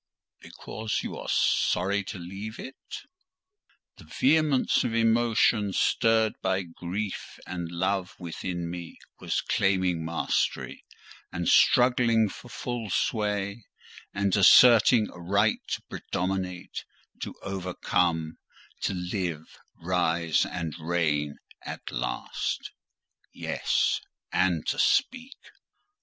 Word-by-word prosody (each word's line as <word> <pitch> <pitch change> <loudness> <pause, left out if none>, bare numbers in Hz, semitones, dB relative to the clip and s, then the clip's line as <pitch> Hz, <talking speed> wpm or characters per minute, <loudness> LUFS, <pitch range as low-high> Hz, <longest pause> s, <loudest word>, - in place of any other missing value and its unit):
"Because 110 0 -4
you - - -5
are - - -7
sorry 100 +2 +2
to 100 - -6
leave 95 +5 -7
it?" 135 - -9 0.9
The - - -14
vehemence 155 - +2
of 115 - -2
emotion, 115 -2 +3
stirred 110 +1 +2
by 95 0 0
grief 90 +4 -5
and 85 -2 -5
love 95 +1 -1
within 85 0 -5
me, 85 0 -7 0.2
was - - -1
claiming 95 -4 +1
mastery, 85 +1 -1 0.5
and - - -3
struggling 120 -3 +4
for 120 - -11
full 120 -3 -4
sway, 105 +1 -1 0.4
and 100 -1 0
asserting 110 +2 +7
a 90 - -12
right 100 +5 +2
to - - -3
predominate, 90 -1 -4 0.4
to - - -5
overcome, 90 -4 -1 0.4
to 100 - -1
live, 90 -3 -4 0.2
rise, 85 -2 +1
and 85 -4 -4
reign 80 -3 0 0.2
at - - -7
last: - - -3 0.6
yes,—and 90 -4 -1
to - - -1
speak. 255 +2 +1
95 Hz, 100 wpm, -27 LUFS, 85-110 Hz, 0.9 s, asserting